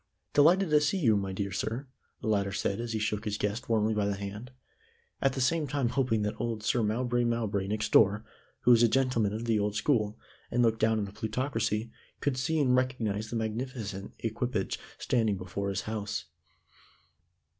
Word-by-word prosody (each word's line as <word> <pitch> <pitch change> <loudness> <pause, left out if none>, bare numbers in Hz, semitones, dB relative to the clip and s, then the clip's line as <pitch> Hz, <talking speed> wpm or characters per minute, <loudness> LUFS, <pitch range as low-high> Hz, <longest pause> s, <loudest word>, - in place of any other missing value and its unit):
"Delighted 170 +4 +5
to 150 -1 +5
see 150 +6 +1
you, 120 - +4
my 100 -1 -1
dear 100 +1 -3
sir," 115 +8 -3 0.4
the - - -4
latter 100 -2 +1
said 100 +1 -1
as 120 -1 -3
he - - 0
shook 105 0 -1
his 105 -2 -2
guest 105 +4 -2
warmly 110 -1 +2
by 105 -1 +1
the 100 - 0
hand, 100 +5 -6 0.7
at 135 -1 +2
the 135 - -3
same 155 +4 +2
time 135 -3 0
hoping 120 -5 +1
that 105 - -1
old 115 -3 -2
Sir 120 - +2
Mowbray 120 +3 +1
Mowbray 110 -5 0
next 105 +2 -2
door, 105 +1 +5 0.4
who 125 - +5
was 120 -1 +7
a 120 - +7
gentleman 125 -4 +2
of 110 +2 -4
the 115 -2 +2
old 105 0 -1
school, 105 -3 +1 0.3
and 120 0 +2
looked 115 -1 +2
down 110 0 +3
on 105 - -1
the 100 - -10
plutocracy, 110 -1 -1 0.3
could 145 -3 0
see 160 +5 0
and 130 -3 +3
recognize 115 -5 -1
the 120 - -4
magnificent 110 -3 -4
equipage 115 -2 -2 0.2
standing 110 -5 +1
before 95 +2 -4
his 95 0 -1
house. 110 -1 -4
110 Hz, 190 wpm, -29 LUFS, 105-125 Hz, 0.7 s, was